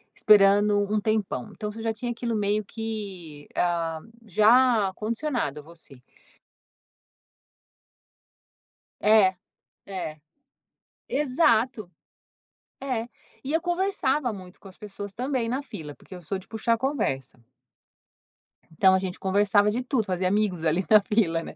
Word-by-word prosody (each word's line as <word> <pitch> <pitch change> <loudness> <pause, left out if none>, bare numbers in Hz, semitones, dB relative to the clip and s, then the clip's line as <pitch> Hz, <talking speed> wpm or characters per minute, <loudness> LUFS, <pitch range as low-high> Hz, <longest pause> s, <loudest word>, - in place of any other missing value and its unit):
esperando 205 0 +5
um 215 - +2
tempão. 210 - -1
Então 210 0 -5
você 225 +1 -9
já 225 0 -1
tinha 240 +2 -4
aquilo 235 -1 -3
meio 210 +1 0
que, 195 -9 -7
ah, 165 -2 0 0.3
já 215 0 +4
condicionado 230 - -2
a - - -11
você. 150 -6 -14 3.0
É, 205 -3 +5 0.5
é. 155 -6 -6 0.9
Exato. 250 - +1 0.9
É. 245 -4 -3 0.4
E 280 - -3
eu 325 - +2
conversava 345 - 0
muito 185 -2 -11
com 195 - -13
as 190 - -16
pessoas 205 -1 -8
também 250 -1 -2
na 260 +4 -2
fila, 150 - -8
porque - - -14
eu 180 - -10
sou 190 +4 -3
de 190 - -13
puxar 230 +1 0
conversa. 215 - -2 1.3
Então 190 +4 +4
a 190 - +3
gente 185 -1 -5
conversava 205 +2 +3
de 240 +4 -2
tudo, 250 -4 0
fazia 185 0 -1
amigos 195 -4 0
ali 165 +4 +1
na 215 -1 +7
fila, 195 -6 +1
né. - - -9
210 Hz, 130 wpm, -26 LUFS, 185-230 Hz, 3.0 s, na